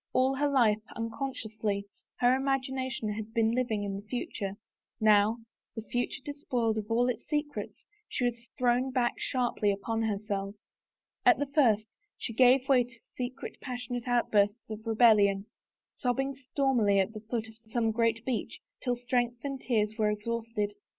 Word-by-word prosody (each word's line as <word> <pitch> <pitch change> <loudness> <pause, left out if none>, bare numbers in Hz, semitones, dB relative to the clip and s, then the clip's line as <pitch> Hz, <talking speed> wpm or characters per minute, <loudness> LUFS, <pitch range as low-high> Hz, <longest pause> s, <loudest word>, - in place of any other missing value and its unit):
All 260 +1 +3
her 290 +1 +2
life, 225 -6 +3
unconsciously, 220 -4 -3 0.4
her 245 +1 +5
imagination 265 -3 -1
had 220 +2 -7
been 225 -1 +3
living 235 -4 0
in 200 -1 -3
the 200 +1 -10
future, 205 -4 -4 0.4
now, 215 +1 +5 0.4
the 225 - -5
future 245 +3 -2
despoiled 245 -6 -1
of 210 - -6 0.2
its 250 - -3
secrets, 295 -1 -3 0.3
she 250 - -1
was 235 -1 -3
thrown 250 +1 +2
back 250 -2 0
sharply 245 -5 0
upon 225 +3 -2
herself. 200 -2 -2 0.7
At - - +6
the 285 - 0
first 245 -7 +3 0.3
she 230 - -4
gave 255 +2 +5
way 260 -3 +5
to 235 -1 -15
secret, 255 +2 -5
passionate 245 -1 -4
outbursts 220 -2 +2
of 215 +1 -7
rebellion, 210 -4 +5 0.5
sobbing 270 +2 -1
stormily 260 -6 +1
at 195 +3 +1
the 215 - -7
foot 225 -2 -1
of 220 - -14
some 225 0 -1
great 230 0 +1
beech 255 -3 -2 0.2
till 245 -2 0
strength 245 -1 -1
and 275 -2 -3
tears 215 -3 0
were 215 -1 +3
exhausted. 215 0 -2
235 Hz, 150 wpm, -30 LUFS, 215-255 Hz, 0.7 s, At